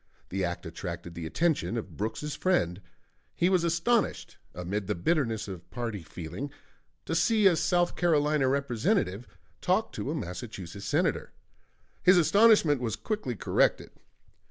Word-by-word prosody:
The 95 +1 -2
act 85 0 -3
attracted 85 +1 -6
the 85 -1 -5
attention 155 - 0
of 115 - -6
Brooks's 115 +8 -3
friend; 100 - +1 0.5
he 175 - +2
was 185 -3 +3
astonished, 170 +8 0 0.2
amid 90 +3 -3
the 105 - 0
bitterness 115 - 0
of 90 -3 -8
party 115 -5 -4
feeling, 85 - -6 0.6
to - - -3
see 220 -3 +3
a 185 -3 +7
South 175 +1 +1
Carolina 150 -4 +2
Representative 135 - 0 0.3
talk 190 +5 +1
to - - -4
a 155 - -1
Massachusetts 100 - -6
Senator. - - 0 0.7
His 185 0 +6
astonishment 175 - +5
was 115 -4 -1
quickly 210 - -3
corrected. - - +1
130 Hz, 135 wpm, -28 LUFS, -, 0.7 s, a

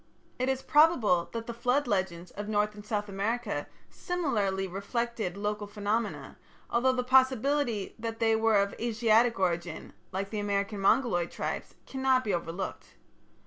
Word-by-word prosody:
It 255 +1 +1
is 265 0 -1
probable 255 - +4
that 230 -1 -4
the 235 - -5
flood 250 +5 +1
legends 185 -4 -1
of 205 +1 -6
North 210 0 +1
and 210 0 -11
South 210 -1 -2
America 205 -4 -2 0.2
similarly 210 - -1
reflected 200 0 -3
local 210 0 -2
phenomena, 210 +2 -3 0.3
although 245 +2 +3
the 250 -1 -1
possibility 260 -3 +2
that 225 0 -4
they 225 -1 +3
were 220 0 +3
of 200 0 0
Asiatic 230 0 +3
origin, 175 -3 -2 0.2
like 195 +1 -3
the 215 - -2
American 200 0 -1
Mongoloid 195 -4 +2
tribes, - - -4
cannot 265 -1 +1
be 205 - -1
overlooked. 175 +2 -4
215 Hz, 145 wpm, -29 LUFS, 200-240 Hz, 0.3 s, probable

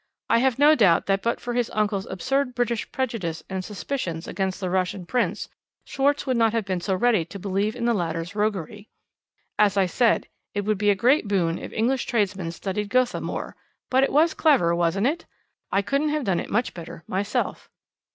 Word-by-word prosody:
I - - +5
have 260 -1 +2
no 295 +2 +6
doubt 195 - +4
that 195 0 +1
but 235 - -1
for 240 - -4
his 240 -1 0
uncle's 210 -2 0
absurd 260 +6 -1
British 240 -2 -1
prejudice 225 -11 -3
and 190 -1 -2
suspicions 185 -5 -4
against 190 -1 -2
the 185 -2 -3
Russian 185 0 -1
Prince, 245 +6 -1 0.4
Schwarz 285 +1 0
would 255 -3 0
not 225 -1 +3
have 225 -3 0
been 185 -3 -2
so 190 +1 0
ready 225 -3 +3
to 175 +5 -9
believe 200 +3 -1
in 235 -1 -3
the 235 - +3
latter's 170 -2 -2
roguery. 205 -1 -2 0.7
As 205 -1 +4
I 195 - +4
said, 230 +6 +2 0.3
it 205 - +1
would 210 0 -1
be 205 0 +3
a 200 - +4
great 245 +5 +3
boon 175 -4 +1
if - - -8
English 245 +4 0
tradesmen 195 -7 0
studied 200 +4 -4
Gotha 255 +1 +1
more; - - -5 0.4
but 260 +1 +4
it - - +1
was 310 +3 +4
clever, 270 - +3
wasn't 170 +4 +1
it? 320 +5 -1 0.4
I 200 - +2
couldn't 275 +8 0
have 300 -1 -1
done 190 -6 +1
it - - -5
much 235 +4 0
better 165 -1 -9
myself." 200 +2 -2
210 Hz, 200 wpm, -24 LUFS, 185-245 Hz, 0.7 s, no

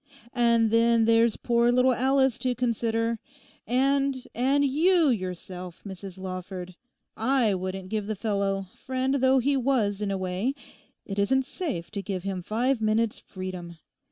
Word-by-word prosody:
And 235 -3 +3
then 230 0 +4
there's 230 -1 +4
poor 235 0 +2
little 250 +1 +4
Alice 265 +1 +2
to 250 -1 -1
consider, 230 -1 0 0.5
and—and 270 +1 +1
you 320 +3 +4
yourself, 180 -4 -4
Mrs. 190 -1 -8
Lawford: 185 -1 -6 0.4
I 230 -1 +2
wouldn't 185 0 -4
give 210 -1 -2
the 215 - -2
fellow—friend 200 +6 -2
though 260 0 +4
he 275 +3 +2
was, 235 -6 +1
in 205 - -1
a 195 - -1
way—it 195 +1 -5
isn't 265 +6 +2
safe 275 - -4
to 205 -2 -3
give 190 -2 -4
him 195 -2 -3
five 235 +6 0
minutes' 215 0 +1
freedom. 180 -3 -7
225 Hz, 135 wpm, -26 LUFS, 195-260 Hz, 0.5 s, then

